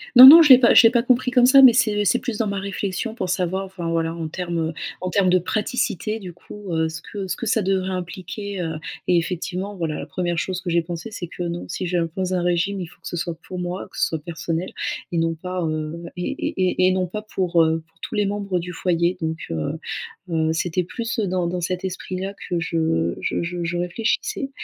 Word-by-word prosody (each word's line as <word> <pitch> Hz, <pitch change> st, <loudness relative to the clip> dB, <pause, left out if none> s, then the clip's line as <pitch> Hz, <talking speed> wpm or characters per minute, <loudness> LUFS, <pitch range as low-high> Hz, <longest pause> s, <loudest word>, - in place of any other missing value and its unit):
Non, 255 Hz, +2 st, +13 dB
non, 325 Hz, +4 st, +12 dB
je 295 Hz, -, +4 dB
l'ai 255 Hz, -1 st, +10 dB
pas 240 Hz, -, +5 dB
je -, -, +9 dB
l'ai 225 Hz, -, +7 dB
pas 240 Hz, -, +3 dB
compris 250 Hz, 0 st, +2 dB
comme 250 Hz, -1 st, +5 dB
ça, 270 Hz, +1 st, +8 dB
mais 250 Hz, -3 st, +9 dB
c'est 215 Hz, -4 st, +2 dB
c'est 245 Hz, -, +3 dB
plus 230 Hz, -4 st, -4 dB
dans 225 Hz, -, 0 dB
ma 200 Hz, -1 st, -2 dB
réflexion 200 Hz, +3 st, -3 dB
pour 185 Hz, -6 st, -3 dB
savoir, 185 Hz, +1 st, -1 dB
enfin, 185 Hz, -3 st, -5 dB
voilà, 165 Hz, 0 st, 0 dB
en 165 Hz, -1 st, -4 dB
termes, 170 Hz, -1 st, -2 dB
heu, -, -, -6 dB, 0.3 s
en 185 Hz, -, -2 dB
termes 190 Hz, -1 st, +2 dB
de 185 Hz, -, +5 dB
praticité 215 Hz, +2 st, -2 dB
du 180 Hz, -4 st, -8 dB
coup, 200 Hz, +2 st, -10 dB
heu, 160 Hz, 0 st, +1 dB
ce 160 Hz, 0 st, -7 dB
que 200 Hz, +2 st, -6 dB
ce 180 Hz, -, -2 dB
que 235 Hz, -, -5 dB
ça 220 Hz, -1 st, +2 dB
devrait 190 Hz, 0 st, 0 dB
impliquer, 185 Hz, +2 st, -5 dB
heu, 160 Hz, -1 st, -3 dB, 0.3 s
et 180 Hz, -, +4 dB
effectivement 185 Hz, +3 st, -3 dB
voilà, 165 Hz, -4 st, -3 dB
la -, -, -5 dB
1re 175 Hz, -1 st, -2 dB
chose 185 Hz, +1 st, -2 dB
que 180 Hz, -, -4 dB
j'ai 170 Hz, 0 st, +2 dB
pensé 170 Hz, +5 st, -6 dB
c'est 185 Hz, -, -6 dB
que 175 Hz, -, -9 dB
non, 170 Hz, 0 st, -3 dB
si 185 Hz, -, -4 dB
j'impose 175 Hz, +2 st, -1 dB
un 180 Hz, -1 st, 0 dB
régime, 180 Hz, +3 st, 0 dB
il 180 Hz, -, -3 dB
faut 165 Hz, -, -18 dB
que -, -, -9 dB
ce 175 Hz, -, -4 dB
soit 170 Hz, 0 st, -3 dB
pour 185 Hz, -, -6 dB
moi, 180 Hz, +1 st, -4 dB
que -, -, -13 dB
ce -, -, +2 dB
soit 160 Hz, -, -3 dB
personnel 170 Hz, +1 st, -3 dB, 0.4 s
et 170 Hz, -, -1 dB
non 165 Hz, 0 st, +1 dB
pas, 180 Hz, +2 st, -4 dB
heu, 155 Hz, +1 st, -3 dB
et 180 Hz, -, -4 dB, 0.2 s
et 185 Hz, 0 st, 0 dB
et -, -, +6 dB
et -, -, +2 dB
non 185 Hz, -1 st, 0 dB
pas 210 Hz, +4 st, -6 dB
pour, 180 Hz, -5 st, +1 dB
heu, 160 Hz, 0 st, +1 dB
pour 160 Hz, 0 st, -34 dB
tous -, -, -6 dB
les 205 Hz, -1 st, +1 dB
membres 200 Hz, -3 st, -2 dB
du 180 Hz, +1 st, -6 dB
foyer. 175 Hz, +1 st, 0 dB
Donc, 160 Hz, 0 st, -3 dB
heu 80 Hz, -2 st, -3 dB, 0.5 s
heu, 160 Hz, -1 st, +1 dB
c'était 175 Hz, +2 st, -1 dB
plus 230 Hz, +5 st, -4 dB
dans 185 Hz, -3 st, 0 dB
dans 175 Hz, +1 st, -2 dB
cet 185 Hz, +2 st, -2 dB
esprit-là 190 Hz, +1 st, -4 dB, 0.2 s
que 175 Hz, -1 st, 0 dB
je 160 Hz, -, 0 dB
je -, -, -1 dB
je 175 Hz, 0 st, -4 dB
je 170 Hz, +1 st, -2 dB
réfléchissais 220 Hz, +9 st, -1 dB
180 Hz, 245 wpm, -22 LUFS, 170-200 Hz, 0.5 s, Non